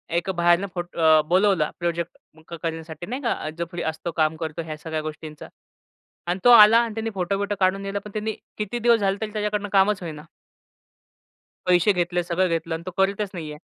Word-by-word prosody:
एक 175 +3 -1
बाहेरून 175 +1 +3
फोट 175 -1 -6
अ, 160 -1 +5
बोलावला 185 -2 +3
प्रोजेक्ट 170 -2 -5 0.2
करण्यासाठी 165 0 -5
नाही 255 +7 -5
का 230 - -2
जो 170 - -2
फ्री 175 -1 -5
असतो, 160 +2 -3
काम 155 0 +2
करतो 160 0 -4
ह्या 155 -1 -6
सगळ्या 160 0 -4
गोष्टींचा. 155 0 -8 0.8
आणि 175 +2 -1
तो 245 - +8
आला 220 -1 +9
आणि 230 -2 -3
त्याने 225 0 -3
फोटो-बिटो 200 +2 -1
काढून 190 +1 +2
न्यायला 200 +1 -3
पण 210 - -8
त्याने 215 +1 -2 0.3
किती 210 +3 -3
दिवस 235 -1 +4
झाले 195 0 +1
तरी 215 -1 -3
त्याच्याकडनं 210 -1 -2
कामच 195 0 +3
होईना. 155 -2 -7 1.4
पैसे 180 +3 +4
घेतले, 175 0 0
सगळं 180 +2 +1
घेतलं 165 0 -2
अन् 165 - -7
तो 185 - -5
करतच 200 +1 +1
नाहीये. 155 -4 -6
175 Hz, 185 wpm, -24 LUFS, 165-205 Hz, 1.4 s, आला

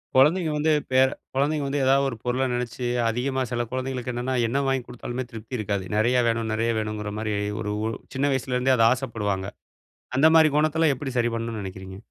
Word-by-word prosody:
குழந்தைங்க 155 +5 +4
வந்து 155 +1 +2 0.2
பேற 130 +1 +5 0.3
குழந்தைங்க 145 +2 +1
வந்து 140 +1 -1
எதாவது 135 +1 +4
ஒரு 115 - -6
பொருள 125 +2 0
நெனைச்சு 120 0 -3 0.2
அதிகமா 130 +3 -1
சில 120 -1 0
குழந்தைகளுக்கு 130 -1 -3
என்னன்னா, 125 +2 -2
என்ன 135 +5 0
வாங்கி 135 -1 0
கொடுத்தாலுமே 125 +1 -5
திருப்தி 115 +2 -6
இருக்காது. 100 -2 -2
நெறைய 120 +4 +3
வேணும் 115 -1 0
நெறைய 115 +2 +1
வேணும்ங்குற 105 -1 -3
மாரி, 110 -1 -2 0.3
ஒரு 105 -1 -2
ஒ - - 0 0.3
சின்ன 140 +2 +1
வயசுலருந்தே 130 0 +1
அத 115 - +5
ஆசப்படுவாங்க. 105 -7 -3 0.7
அந்த 140 +4 +5
மாதிரி 160 -1 +7
குணத்தலாம் 155 0 +3
எப்படி 135 +1 -5
சரி 120 0 +2
பண்ணணும்ன்னு 115 -2 -3
நெனைக்கிறீங்க? 95 0 -8
125 Hz, 180 wpm, -25 LUFS, 110-135 Hz, 0.7 s, மாதிரி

